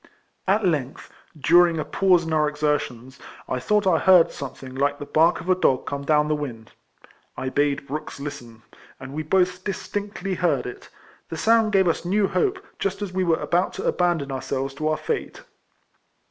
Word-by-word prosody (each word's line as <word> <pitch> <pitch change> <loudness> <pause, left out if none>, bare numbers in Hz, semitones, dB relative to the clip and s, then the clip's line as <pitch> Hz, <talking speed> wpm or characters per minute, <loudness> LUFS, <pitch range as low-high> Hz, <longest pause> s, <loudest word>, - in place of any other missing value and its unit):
At 200 +2 +2
length, 145 -7 -2 0.3
during 170 +3 +5
a 155 - -2
pause 185 -3 +3
in 160 - -3
our 155 -1 +3
exertions, 150 -4 -2 0.3
I 130 - -2
thought 210 +10 +1
I 175 -4 +3
heard 185 -3 +6
something 130 -1 -8
like 140 +2 0
the 145 - -7
bark 165 +4 +3
of 170 - -11
a 185 - +5
dog 135 -8 +1
come 140 0 -4
down 150 +1 +2
the 155 - +1
wind. 125 -7 -6 0.7
I 130 0 -3
bade 145 0 0
Brooks 145 +1 -6
listen, 125 -6 -8 0.4
and 135 +1 -9
we 155 - -3
both 180 +3 +1
distinctly 200 -1 -4
heard 180 -1 0
it - - -9 0.2
— - - -30
the - - -5
sound 225 -1 +3
gave 190 -2 +4
us 165 - 0
new 195 +3 +1
hope, 395 - -1
just 195 +1 -2
as 190 -3 -6
we 185 0 0
were 165 -2 +2
about 175 +2 0
to - - -6
abandon 170 -6 0
ourselves 135 +1 -3
to 155 +2 -3
our 155 - +1
fate. 475 +2 -4
155 Hz, 190 wpm, -23 LUFS, 140-185 Hz, 0.7 s, heard